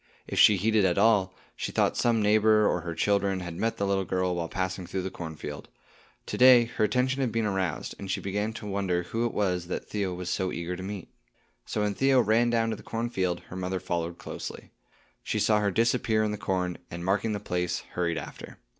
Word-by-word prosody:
If - - -2
she 105 - +7
heeded 110 +2 +2
at 90 -2 +2
all, 100 -5 +3 0.2
she - - -4
thought - - +2
some 115 -3 +2
neighbor 105 0 +4
or 90 - 0
her 85 -1 -5
children 100 -1 +1
had 85 -1 -5
met 115 +7 -1
the 100 - 0
little 100 -1 +1
girl 90 -1 0
while 85 -2 -3
passing 95 -1 -3
through 95 +1 -3
the 95 - -4
cornfield. 80 -4 -7 0.6
To - - -4
day 125 -2 +8
her 115 - -2
attention 130 +4 +1
had 125 -4 0
been 115 0 0
aroused, 95 -4 -2
and 100 - -7
she - - 0
began 105 +3 -2
to 110 - -8
wonder 95 -3 -1
who 115 +7 -1
it - - -5
was 90 -4 -1
that 90 - -4
Theo 100 -4 -1
was 90 0 -4
so 95 0 -1
eager 85 +1 -4
to 90 - -7
meet. 95 -1 -6 0.6
So 105 - -2
when 105 -1 0
Theo 135 +3 +3
ran 115 +1 +3
down 115 -1 +1
to - - -2
the 105 - -12
cornfield, 95 -7 -2
her - - -6
mother 95 0 -2
followed 85 -1 -3
closely. - - -8 0.5
She - - -2
saw 105 -1 +3
her 105 -1 +1
disappear 115 +1 +2
in 105 - 0
the 105 - -3
corn, 90 -3 -1
and 85 +1 -6
marking 105 +3 +1
the 105 - -2
place, 90 -4 -2
hurried 85 -2 0
after. - - -8
100 Hz, 220 wpm, -28 LUFS, 90-110 Hz, 0.6 s, day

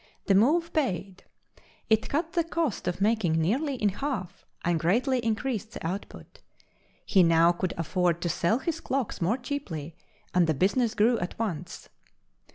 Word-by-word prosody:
The 195 - +3
move 310 - +3
paid; 195 - -2 0.6
it 220 0 +2
cut 325 +3 -1
the 340 -2 +2
cost 330 - -2
of 180 - -2
making 210 -5 +2
nearly 240 - +1
in 210 -4 +1
half 195 -5 -5 0.2
and 170 -1 +2
greatly 245 - +2
increased 225 0 -2
the - - -7
output. 190 +4 -7 0.6
He 190 - +4
now 165 0 +5
could 175 +1 -3
afford 170 +1 0
to - - 0
sell 170 +7 +1
his 320 +4 -3
clocks 265 - -3
more 195 +9 +1
cheaply, 190 - -5 0.4
and 180 -2 +4
the 160 - +1
business 220 - +1
grew 230 +3 +3
at 175 - -5
once. 180 -6 -4
205 Hz, 160 wpm, -27 LUFS, 175-260 Hz, 0.6 s, now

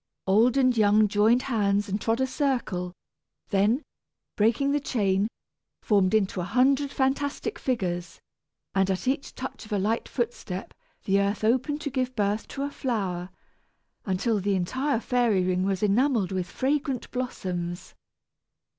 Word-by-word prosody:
Old 225 +7 +4
and 255 -2 +4
young 215 -1 +4
joined 215 +5 +3
hands 205 -4 +1
and 200 +1 -2
trod 225 +1 0
a 265 - +3
circle, 250 - -1 0.6
then, 210 +8 +2 0.5
breaking 235 +7 +2
the 290 - +2
chain, 200 -7 +1 0.6
formed 200 -2 +3
into 195 -3 +1
a - - -2
hundred 265 +7 +2
fantastic 285 +9 -1
figures; 180 -8 -2 0.5
and 195 0 +2
at 190 +6 -2
each 275 +2 -1
touch 260 - -6
of 215 - -14
a 205 - +1
light 215 +4 -1
footstep, 230 -6 -4 0.3
the 195 0 +3
earth 200 +2 -1
opened 260 +7 +1
to 285 - -3
give 255 -1 -2
birth 205 0 0
to 275 - -5
a 285 - -3
flower, 190 -10 -2 0.7
until 205 +3 0
the 200 +1 0
entire 255 +9 0
fairy 235 -6 +2
ring 185 0 +1
was 195 0 -1
enamelled 215 -1 +2
with 185 -2 -2
fragrant 270 0 -1
blossoms. 180 -8 -4
215 Hz, 145 wpm, -26 LUFS, 195-260 Hz, 0.7 s, Old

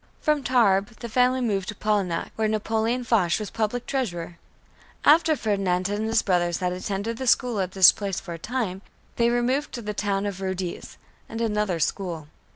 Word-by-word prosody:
From 300 -1 +1
Tarbes, 220 -4 +2
the 235 - -5
family 250 +2 +2
moved 200 -6 -1
to 215 - -5
Polignac, 200 -5 -1
where 220 0 0
Napoleon 220 +3 0
Foch 205 -8 +2
was 215 -2 -5
Public 225 +2 -2
Treasurer. 175 -10 -3 0.7
After 315 +1 +5
Ferdinand 195 -6 0
and 210 +2 -2
his 225 0 +2
brothers 175 -3 +1
had 180 -1 -1
attended 200 +4 -3
the 260 - -4
school 240 -2 +2
at 185 -1 -2
this 190 -2 +8
place 200 -3 -4
for 175 -3 -8
a 165 - -8
time, 215 -3 -3 0.4
they 235 0 +3
removed 245 +4 0
to 240 - -5
the 210 0 -3
town 200 -1 -1
of 195 -2 -4
Rodez 190 -2 -4 0.3
and 225 - -5
another 210 -6 0
school. 165 -2 -2
210 Hz, 180 wpm, -25 LUFS, 185-235 Hz, 0.7 s, this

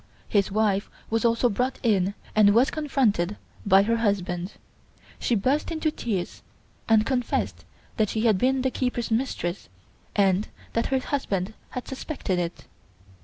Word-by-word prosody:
His 200 -2 +1
wife 205 -1 +1 0.2
was 225 0 +1
also 235 +1 +3
brought 250 +4 -1
in 200 -4 +2 0.2
and 205 -1 +6
was 245 +4 +4
confronted 230 - +1 0.3
by 195 0 +6
her 230 +2 +1
husband. 190 -4 -1 0.7
She 240 - +1
burst 260 +9 +1
into 315 -2 0
tears 205 -11 -3 0.5
and 220 -1 +5
confessed 250 -2 -1 0.3
that 215 -2 +2
she 220 - -1
had 220 -5 +3
been 260 +2 +2
the 260 - +1
keeper's 250 -3 -2
mistress, 210 - -2 0.5
and 195 0 +3 0.3
that 230 - +1
her 265 - +1
husband 220 -8 -2 0.2
had 250 - -6
suspected 265 - -3
it. 170 0 -4
220 Hz, 145 wpm, -26 LUFS, 195-255 Hz, 0.7 s, and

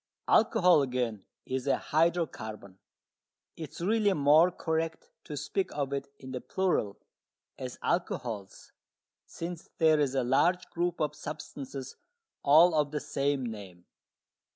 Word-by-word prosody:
Alcohol, 180 -7 +5
again, 125 -6 -2 0.2
is 130 +1 -3
a 140 - +3
hydrocarbon. 135 - -1 0.8
It 160 -3 -7
is - - -11
really 205 +2 +2
more 150 +3 +5
correct 165 - -3
to - - -6
speak 390 -2 -2
of 140 -1 -2
it 140 0 -4
in 130 -1 -10
the 125 -1 -4
plural, 180 - 0 0.6
as 125 -2 -6
"alcohols," 115 - -3 0.6
since 170 0 -7
there 160 -2 +4
is 140 -2 +1
a 130 - +2
large 175 +9 +2
group 175 0 -1
of 150 -2 0
substances 140 -3 -7 0.4
all 160 +5 +6
of 150 -2 +2
the 150 0 -3
same 140 -1 -1
name. 100 -6 -8
145 Hz, 130 wpm, -30 LUFS, 130-170 Hz, 0.8 s, all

